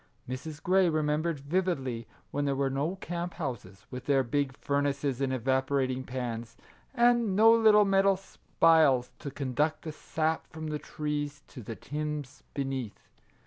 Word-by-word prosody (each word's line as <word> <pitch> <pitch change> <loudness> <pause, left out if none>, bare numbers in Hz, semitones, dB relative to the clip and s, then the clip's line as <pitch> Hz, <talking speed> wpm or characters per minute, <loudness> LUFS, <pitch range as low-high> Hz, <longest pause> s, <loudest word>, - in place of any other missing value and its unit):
Mrs. 145 +5 -6
Grey 185 0 +4
remembered 155 +1 0
vividly 140 - -1 0.2
when 145 +1 -1
there 140 -1 +1
were 135 0 0
no 145 +7 -1
camp 175 -1 -5
houses, 115 - -6
with 125 -1 -7
their 135 -2 +4
big 135 +2 -1
furnaces 140 -1 -1
and 135 -1 +1
evaporating 130 +1 0
pans, 120 -3 -5 0.4
and 235 -4 +3
no 220 +3 +7
little 215 -2 +6
metal 195 0 +4
<c 195 - -20 0.2
spiles 155 -7 +5
" - - -38
to 140 - -5
conduct 140 +3 -1
the 160 - -4
sap 160 +1 -2
from 160 -1 -6
the 150 0 -2
trees 145 -1 -4
to 130 - -9
the 115 +1 -6
tins 150 -1 -5
beneath. 135 -6 -4
145 Hz, 155 wpm, -29 LUFS, 130-165 Hz, 0.4 s, no